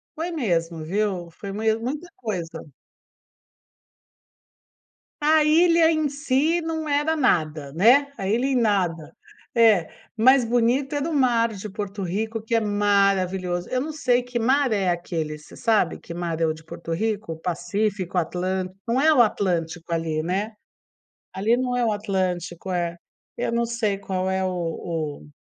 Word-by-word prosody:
Foi 335 +3 -3
mesmo, 170 - -1
viu? 185 0 -1
Foi 200 +4 -8
mes 220 +2 +1
muita 290 +9 -4
coisa. 175 -9 -5 2.6
A 310 +1 +4
ilha 330 +1 +5
em 310 -2 +1
si 290 +4 +1
não 320 -1 -3
era 295 +3 +1
nada, 155 - +1
né, 250 - +5
a 190 - -3
ilha 235 +6 +1
em 275 - +1
nada. 190 -9 0 0.4
É, 215 -8 +5 0.3
mais 260 +3 +6
bonito 245 +4 +1
era 290 +3 -1
o - - -3
mar 235 -5 +2
de 205 +2 -7
Porto 200 0 -5
Rico, 220 +5 -2
que 220 +2 -5
é 230 - +4
maravilhoso. 195 -4 +1
Eu 255 - 0
não 310 +2 -4
sei 250 -5 +2
que 245 0 -5
mar 260 +2 +2
é 195 -3 +1
aquele, 165 -3 -2
você 150 - -15
sabe 215 -7 +1
que 170 - -10
mar 170 -1 -3
é 165 - +4
o 155 - +1
de 160 0 -14
Porto 165 - -8
Rico? 205 -2 -2
Pacífico, 185 +2 -2
Atlân 185 +2 -1 0.2
não 240 +3 +1
é 315 +1 +5
o 250 - +6
Atlântico 175 -6 0
ali, 160 -1 -1
né, 195 +6 -2 0.8
ali 220 +5 +2
não 250 -1 -1
é 245 - +1
o 220 - +2
Atlântico, 185 -3 -2
é, 170 -1 -1 0.4
eu - - -2
não 235 0 +1
sei 230 -4 -1
qual 190 -1 -2
é 190 0 0
o - - 0 0.8
o - - -16
210 Hz, 160 wpm, -24 LUFS, 175-250 Hz, 2.6 s, mais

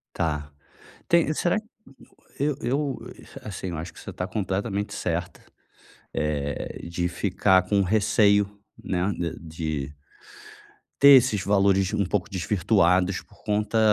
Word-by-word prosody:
Tá, 75 -2 -2 0.6
tem 170 -2 +3
será 175 +5 +1 0.8
eu 145 0 0
eu, 135 +3 -1 0.4
assim, 95 -2 -6
eu 85 - -4
acho 85 +2 -6
que - - -12
você - - -8
está 90 - -4
completamente 100 0 -2
certa, 90 +1 -3 0.7
eh, 75 -2 -3
de 85 +1 -1
ficar 95 +1 +2
com 100 +2 +1
o - - +4
receio, 100 +1 +3 0.4
né, 90 +2 -1
de 85 -2 -3
de 80 -3 -4 1.0
ter 140 - +7
esses 110 -6 0
valores 95 -1 +3
um 100 - +1
pouco 90 0 -1
desvirtuados 95 0 +2
por - - -23
conta 105 +1 0
95 Hz, 130 wpm, -25 LUFS, 85-105 Hz, 1.0 s, ter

